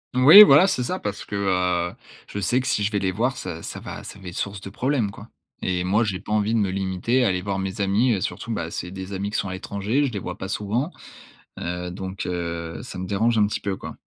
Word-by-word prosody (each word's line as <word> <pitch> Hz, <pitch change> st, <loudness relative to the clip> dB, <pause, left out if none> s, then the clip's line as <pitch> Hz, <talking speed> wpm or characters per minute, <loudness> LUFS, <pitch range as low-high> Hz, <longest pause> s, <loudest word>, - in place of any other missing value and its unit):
Oui 150 Hz, +11 st, +11 dB
voilà, 180 Hz, +2 st, +7 dB
c'est 125 Hz, -, 0 dB
ça 185 Hz, +9 st, -2 dB
parce 100 Hz, -1 st, -4 dB
que, 105 Hz, -, -6 dB
heu, 90 Hz, -3 st, +1 dB, 0.4 s
je 100 Hz, -, -4 dB
sais 120 Hz, +7 st, +1 dB
que 130 Hz, -, -5 dB
si 105 Hz, -, +1 dB
je 105 Hz, -, 0 dB
vais 100 Hz, -, +1 dB
les 95 Hz, -1 st, 0 dB
voir 125 Hz, +7 st, 0 dB
ça 85 Hz, -6 st, -6 dB
ça -, -, -6 dB
va -, -, -7 dB
ça -, -, -9 dB
va 90 Hz, -2 st, -8 dB
être 85 Hz, -, -10 dB
source 100 Hz, -1 st, -3 dB
de 95 Hz, -, -7 dB
problèmes, 125 Hz, -1 st, 0 dB
quoi -, -, -12 dB, 0.3 s
et 90 Hz, -1 st, -1 dB
moi 105 Hz, +6 st, +2 dB
j'ai 95 Hz, -3 st, -2 dB
pas -, -, -9 dB
envie 105 Hz, +1 st, +1 dB
de 115 Hz, -, +3 dB
me 100 Hz, -2 st, +1 dB
limiter 95 Hz, +7 st, 0 dB
à -, -, +4 dB
aller 90 Hz, -1 st, 0 dB
voir 95 Hz, -1 st, -2 dB
mes 95 Hz, +2 st, -3 dB
amis. 110 Hz, +5 st, +3 dB
Heu, 95 Hz, -, -1 dB
surtout, 115 Hz, -, -4 dB
bah, 85 Hz, -5 st, -3 dB
c'est 90 Hz, +1 st, -5 dB
des 95 Hz, 0 st, -7 dB
amis 100 Hz, +2 st, -3 dB
qui -, -, -1 dB
sont 100 Hz, -, -2 dB
à -, -, -4 dB
l'étranger, 100 Hz, +9 st, -1 dB
je 130 Hz, -, -2 dB
les 100 Hz, -, -2 dB
vois 90 Hz, 0 st, -6 dB
pas 95 Hz, -, -5 dB
souvent, 110 Hz, -, -1 dB, 0.7 s
heu, 90 Hz, +1 st, -4 dB
donc, 95 Hz, +1 st, -5 dB
heu, 85 Hz, -2 st, -4 dB
ça 120 Hz, -, -8 dB
me 95 Hz, -, -3 dB
dérange 110 Hz, +4 st, +1 dB
un 105 Hz, -, +5 dB
petit 105 Hz, -, -3 dB
peu 100 Hz, -1 st, -2 dB
quoi. -, -, -9 dB
100 Hz, 270 wpm, -24 LUFS, 95-115 Hz, 0.7 s, Oui